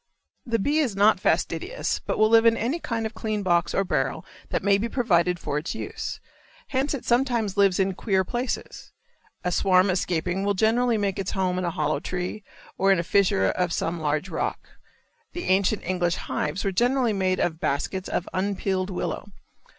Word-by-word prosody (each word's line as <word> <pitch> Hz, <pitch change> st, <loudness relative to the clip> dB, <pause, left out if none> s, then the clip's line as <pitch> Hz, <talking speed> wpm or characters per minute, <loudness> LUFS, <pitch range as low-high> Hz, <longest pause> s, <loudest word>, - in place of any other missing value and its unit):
The 230 Hz, -1 st, +1 dB
bee 285 Hz, +9 st, +1 dB
is 255 Hz, -10 st, 0 dB
not 205 Hz, +2 st, +4 dB
fastidious, -, -, -1 dB
but -, -, -1 dB
will 215 Hz, -, +5 dB
live 225 Hz, 0 st, +6 dB
in 230 Hz, 0 st, +4 dB
any 255 Hz, +10 st, -1 dB
kind 230 Hz, -7 st, -3 dB
of 220 Hz, -, -4 dB
clean 215 Hz, -2 st, -3 dB
box 175 Hz, -2 st, +2 dB
or 195 Hz, -, +2 dB
barrel 185 Hz, -, -1 dB, 0.2 s
that -, -, -1 dB
may 200 Hz, -1 st, +4 dB
be 230 Hz, +3 st, -2 dB
provided 180 Hz, -9 st, +2 dB
for 150 Hz, -3 st, -2 dB
its 170 Hz, +8 st, -5 dB
use, 445 Hz, -, -5 dB, 0.5 s
hence 275 Hz, +2 st, 0 dB
it 265 Hz, -, -8 dB
sometimes 240 Hz, -5 st, +1 dB
lives 200 Hz, -2 st, +3 dB
in 190 Hz, 0 st, +2 dB
queer 190 Hz, 0 st, +1 dB
places. 240 Hz, +6 st, -4 dB, 0.5 s
A 180 Hz, -, 0 dB
swarm 185 Hz, +1 st, +3 dB
escaping 180 Hz, +1 st, -1 dB
will 200 Hz, 0 st, +1 dB
generally 230 Hz, +3 st, +2 dB
make 200 Hz, -2 st, -1 dB
its 195 Hz, -, -3 dB
home 185 Hz, -1 st, 0 dB
in 185 Hz, -, -2 dB
a -, -, +1 dB
hollow 150 Hz, -3 st, -1 dB
tree 180 Hz, +6 st, -4 dB, 0.4 s
or 195 Hz, +1 st, +4 dB
in 195 Hz, -, +4 dB
a 170 Hz, -, 0 dB
fissure 180 Hz, -, +2 dB
of 180 Hz, -2 st, -1 dB
some 170 Hz, 0 st, -2 dB
large 155 Hz, +3 st, 0 dB
rock. 165 Hz, -, -3 dB, 0.6 s
The 350 Hz, -, -5 dB
ancient 195 Hz, +2 st, +2 dB
English 175 Hz, -1 st, 0 dB
hives 150 Hz, +6 st, -3 dB
were 195 Hz, -, 0 dB
generally 245 Hz, +3 st, +2 dB
made 185 Hz, -2 st, 0 dB
of 160 Hz, -2 st, 0 dB
baskets 185 Hz, +6 st, -2 dB
of 175 Hz, -, -2 dB
unpeeled 190 Hz, 0 st, -1 dB
willow. 185 Hz, +2 st, -4 dB
195 Hz, 190 wpm, -25 LUFS, 180-225 Hz, 0.6 s, live